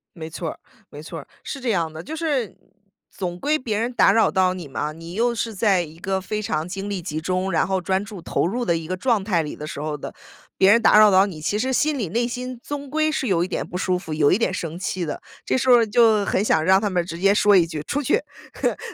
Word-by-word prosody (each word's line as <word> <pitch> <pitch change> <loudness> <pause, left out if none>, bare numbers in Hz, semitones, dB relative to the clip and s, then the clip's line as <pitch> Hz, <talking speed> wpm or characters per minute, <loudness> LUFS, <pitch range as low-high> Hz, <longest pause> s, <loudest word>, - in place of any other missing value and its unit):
没 160 -1 -7
错 165 0 -5
儿， - - -10 0.3
没 145 - -10
错 165 +1 -7
儿， - - -14 0.2
是 275 - -6
这 245 -2 -1
样 165 -5 0
的。 160 - -8
就 315 - -7
是 290 - -1 0.5
总 175 -2 -5
归 300 +9 +1
别 220 -6 -2
人 235 +3 -1
打 195 - +5
扰 225 +1 +4
到 185 -1 +2
你 170 -6 -7
嘛， 150 +3 -3
你 165 +2 -10
又 235 +2 +1
是 225 -1 -3
在 195 -3 +2
一 160 0 -10
个 190 +1 -2
非 215 +3 -4
常 155 -4 -2
精 195 +2 -5
力 200 -2 -3
集 160 -2 -4
中， 185 +3 -1
然 160 - +2
后 190 0 0
专 190 +3 -1
注 205 -4 -9
投 - - 0
入 240 +6 -2
的 170 -6 +1
一 165 - -5
个 185 +3 -3
状 230 -1 +1
态 185 -5 +1
里 150 - -6
的 150 - -7
时 145 - -6
候 150 0 -3
的， - - -8 0.4
别 190 +1 +5
人 230 - +5
打 210 - +6
扰 215 -1 +8
到 190 +1 +5
你， 165 -6 -8
其 205 +7 -1
实 260 +4 0
心 295 +2 +1
里 205 - -2
内 235 +7 0
心， 250 0 -5
总 285 -2 -6
归 310 +1 +1
是 285 -3 -2
有 175 -4 +2
一 185 - -5
点 - - -3
不 180 - -7
舒 185 0 0
服， 160 -4 -8
有 150 -2 +3
一 - - +3
点 230 - 0
生 170 -2 -4
气 185 -1 -3
的， 150 - -5 0.2
这 - - 0
时 260 - -1
候 245 - +9
儿 230 - +3
就 220 -1 +4
很 195 - +1
想 160 -7 +2
让 190 +2 +5
他 205 -1 -1
们 175 -2 0
直 170 -1 -7
接 195 +2 +4
说 205 -1 +5
一 170 - +5
句： 155 -3 -5
“出 290 - -2 0.7
去！” - - -18
190 Hz, 295 characters per minute, -22 LUFS, 170-230 Hz, 0.7 s, 候